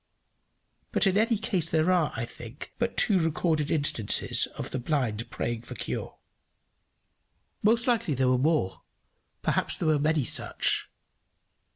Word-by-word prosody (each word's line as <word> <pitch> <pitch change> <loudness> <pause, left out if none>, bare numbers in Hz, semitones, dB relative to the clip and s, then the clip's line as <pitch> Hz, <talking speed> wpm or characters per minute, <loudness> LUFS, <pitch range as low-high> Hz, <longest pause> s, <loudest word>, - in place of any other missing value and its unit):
But - - +2
in 195 -1 +2
any 225 +2 +2
case 195 -7 -2
there 160 +3 +2
are, 175 -5 +1
I 115 +1 -3
think, 120 +3 -10
but 235 0 -2
two 200 -5 +5
recorded 160 -2 0
instances 145 -9 +3
of - - -5
the 130 - -3
blind 120 -5 -2
praying 120 -1 -4
for - - -10
cure. - - -5 1.5
Most 230 +3 +2
likely 225 - 0
there 130 0 +1
were 125 -1 +2
more, 150 - 0 0.6
perhaps - - 0
there 160 - -1
were 155 -2 +2
many 155 0 +1
such. - - +1
155 Hz, 145 wpm, -27 LUFS, 130-185 Hz, 1.5 s, two